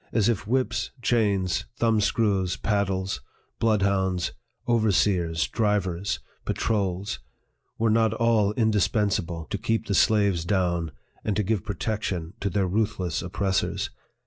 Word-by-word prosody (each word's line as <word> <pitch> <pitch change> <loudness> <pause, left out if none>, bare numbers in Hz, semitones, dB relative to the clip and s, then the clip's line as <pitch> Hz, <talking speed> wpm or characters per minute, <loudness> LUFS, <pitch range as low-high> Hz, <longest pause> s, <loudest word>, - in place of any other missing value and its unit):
As 110 -2 +2
if 115 -4 0
whips, 115 -5 0
chains, 100 - +1
thumb 115 -2 +3
screws, 100 -4 +1
paddles, 95 -2 -1 0.4
bloodhounds, 100 -4 +1 0.4
overseers, 95 -7 +2
drivers, 100 -4 0 0.2
patrols, 100 -3 -1 0.6
were 115 -1 +2
not 110 -1 +3
all 115 -3 +3
indispensable 105 -6 +1
to 100 - -1
keep 115 +2 0
the 100 - -1
slaves 100 -5 +3
down, 85 -3 0 0.3
and 105 - 0
to 105 - +1
give 105 0 0
protection 100 -5 -3
to 100 - -1
their 95 +1 +1
ruthless 95 -3 -1
oppressors 95 +2 -1
100 Hz, 120 wpm, -26 LUFS, 95-110 Hz, 0.6 s, thumb